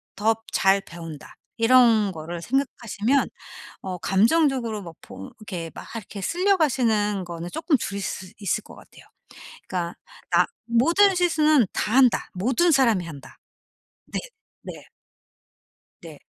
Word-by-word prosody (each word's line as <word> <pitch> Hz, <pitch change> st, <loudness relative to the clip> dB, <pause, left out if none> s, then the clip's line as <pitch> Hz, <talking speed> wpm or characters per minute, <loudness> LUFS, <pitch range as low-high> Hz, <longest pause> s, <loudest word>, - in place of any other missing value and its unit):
더 220 Hz, +3 st, +2 dB, 0.2 s
잘 195 Hz, +1 st, +3 dB
배운다.' 165 Hz, -5 st, -10 dB, 0.2 s
이런 230 Hz, -3 st, +5 dB
거를 165 Hz, 0 st, -7 dB
생각하시면 255 Hz, +1 st, 0 dB, 0.5 s
어 185 Hz, -1 st, -5 dB
감정적으로 230 Hz, -, +2 dB
막 170 Hz, -3 st, -10 dB
보 95 Hz, -, -10 dB
이렇게 175 Hz, -6 st, -6 dB
막 -, -, -9 dB
이렇게 210 Hz, -2 st, -7 dB
쓸려 370 Hz, -, +2 dB
가시는 220 Hz, -, +1 dB
거는 170 Hz, -1 st, -6 dB
쪼끔 310 Hz, -, +1 dB
줄일 200 Hz, -2 st, -4 dB
수 190 Hz, -1 st, -5 dB
있을 205 Hz, +1 st, -1 dB
것 -, -, -13 dB
같아요. -, -, -17 dB, 0.6 s
그러니까 175 Hz, -2 st, -3 dB, 0.4 s
나 -, -, +4 dB, 0.2 s
'모든 335 Hz, -, +4 dB
실수는 310 Hz, -, +3 dB
다 210 Hz, -, -2 dB
한다. 260 Hz, -2 st, +4 dB
모든 255 Hz, -, +2 dB
사람이 230 Hz, -, +3 dB
한다.' 140 Hz, -5 st, -11 dB, 0.7 s
네. -, -, -2 dB, 0.4 s
네. -, -, -10 dB, 1.1 s
네. -, -, -11 dB
215 Hz, 255 characters per minute, -24 LUFS, 185-270 Hz, 1.1 s, 이런